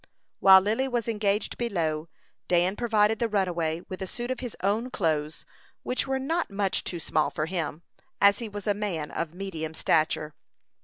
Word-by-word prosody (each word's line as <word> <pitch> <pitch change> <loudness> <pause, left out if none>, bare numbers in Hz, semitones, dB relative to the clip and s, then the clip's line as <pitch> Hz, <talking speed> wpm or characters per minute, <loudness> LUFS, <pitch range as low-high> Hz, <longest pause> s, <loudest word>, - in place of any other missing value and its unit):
While 190 -1 +9
Lily 220 +7 0
was 240 -3 -1
engaged 210 -2 0
below, 165 -9 -1 0.4
Dan 180 +2 +2
provided 220 -2 +2
the 235 - +1
runaway 175 -5 0
with 185 - -7
a 190 - -3
suit 240 +6 -4
of 255 - -3
his 245 -4 -6
own 215 +6 +1
clothes, 155 -7 -1 0.4
which 255 +2 -1
were 265 0 0
not 325 +6 -1
much 195 -1 0
too 175 - -4
small 155 -1 +1
for 155 - -2
him, 165 -2 -3 0.4
as 200 0 +5
he 230 -2 -5
was 205 -1 -7
a 205 - +3
man 195 -7 -3
of 165 0 -4
medium 165 -5 -5
stature. 155 -1 +1
195 Hz, 175 wpm, -27 LUFS, 165-225 Hz, 0.4 s, While